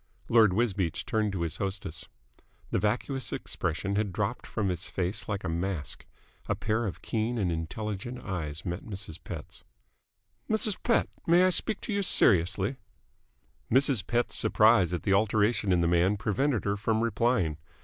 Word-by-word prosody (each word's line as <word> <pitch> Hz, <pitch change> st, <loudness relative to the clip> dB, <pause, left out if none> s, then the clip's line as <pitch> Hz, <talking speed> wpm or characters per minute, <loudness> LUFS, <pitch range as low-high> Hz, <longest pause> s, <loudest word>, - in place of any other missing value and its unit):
Lord 110 Hz, -5 st, +5 dB
Wisbeach 95 Hz, -6 st, 0 dB
turned 110 Hz, -3 st, 0 dB
to 90 Hz, -, -3 dB
his 85 Hz, 0 st, -3 dB
hostess. 95 Hz, -4 st, -5 dB, 0.6 s
The -, -, +1 dB
vacuous 120 Hz, +6 st, -1 dB
expression 100 Hz, +5 st, -2 dB
had 105 Hz, -2 st, 0 dB
dropped -, -, -3 dB
from 100 Hz, -3 st, -1 dB
his 90 Hz, 0 st, -2 dB
face 95 Hz, +4 st, -2 dB
like 100 Hz, -2 st, -2 dB
a -, -, -3 dB
mask. 85 Hz, -2 st, -3 dB, 0.4 s
A -, -, +2 dB
pair 110 Hz, +1 st, -1 dB
of 95 Hz, -, -7 dB
keen 115 Hz, +2 st, -1 dB
and 95 Hz, -6 st, 0 dB
intelligent 105 Hz, +8 st, -4 dB
eyes 80 Hz, -6 st, -4 dB
met 85 Hz, 0 st, -3 dB
Mrs. 95 Hz, -6 st, -6 dB
Pett's. 80 Hz, -4 st, -8 dB, 0.9 s
"Mrs. 215 Hz, -2 st, +1 dB
Pett, 235 Hz, -, +2 dB, 0.2 s
may 175 Hz, +2 st, +6 dB
I 185 Hz, -, +4 dB
speak 215 Hz, +3 st, 0 dB
to 215 Hz, -, -4 dB
you 200 Hz, -, +1 dB
seriously?" 100 Hz, -, +3 dB, 0.9 s
Mrs. 130 Hz, -3 st, +3 dB
Pett's 120 Hz, 0 st, 0 dB
surprise 110 Hz, -5 st, +4 dB
at 90 Hz, -, -3 dB
the 95 Hz, -, +2 dB
alteration 105 Hz, 0 st, +2 dB
in 90 Hz, -1 st, +3 dB
the 85 Hz, -, +2 dB
man 90 Hz, +4 st, +3 dB
prevented 120 Hz, +4 st, 0 dB
her 100 Hz, 0 st, 0 dB
from 110 Hz, +1 st, 0 dB
replying. 105 Hz, -8 st, +1 dB
105 Hz, 160 wpm, -29 LUFS, 90-115 Hz, 0.9 s, may